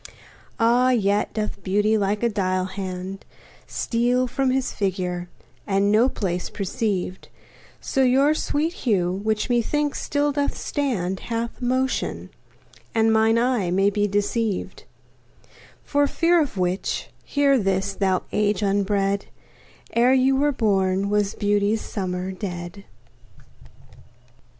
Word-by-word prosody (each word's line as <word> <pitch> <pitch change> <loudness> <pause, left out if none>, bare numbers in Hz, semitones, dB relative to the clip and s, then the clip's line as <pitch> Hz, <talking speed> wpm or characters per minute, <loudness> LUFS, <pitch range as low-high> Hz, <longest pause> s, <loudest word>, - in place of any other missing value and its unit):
Ah! 240 +2 +4
yet 205 -4 +1
doth 215 -1 -4
beauty, 205 +3 +2
like 205 +1 0
a - - +4
dial 185 -3 0
hand, 190 0 -6 0.4
Steal 245 +2 0
from 260 +2 0
his 260 0 0
figure, 180 -3 -2 0.4
and 200 0 +2
no 230 +5 +4
pace 180 -6 -3
perceived; 195 -3 -3 0.5
So 270 - -1
your 265 +4 +4
sweet 310 +2 -1
hue, 200 - 0
which 215 +3 -1
methinks 280 +5 0
still 290 0 0
doth 285 0 -1
stand, 195 - -2
Hath 230 +2 -4
motion, 255 +1 -1 0.6
and 225 0 +3
mine 220 +1 +4
eye 235 -6 +1
may 195 +3 +2
be 205 0 +1
deceived: 205 +1 -2 1.0
For 285 0 +2
fear 335 +3 +3
of 275 -9 -3
which, 180 +1 -1
hear 280 -2 +2
this, 195 -1 0
thou 190 -2 0
age 210 -1 +1
unbred: 200 0 0 0.7
Ere 245 +2 +4
you 265 +1 +3
were 290 +2 +2
born 200 -5 +1
was 205 -1 +1
beauty's 205 +1 +1
summer 185 -2 -4
dead. 180 0 -6
210 Hz, 120 wpm, -23 LUFS, 195-250 Hz, 1.0 s, Ah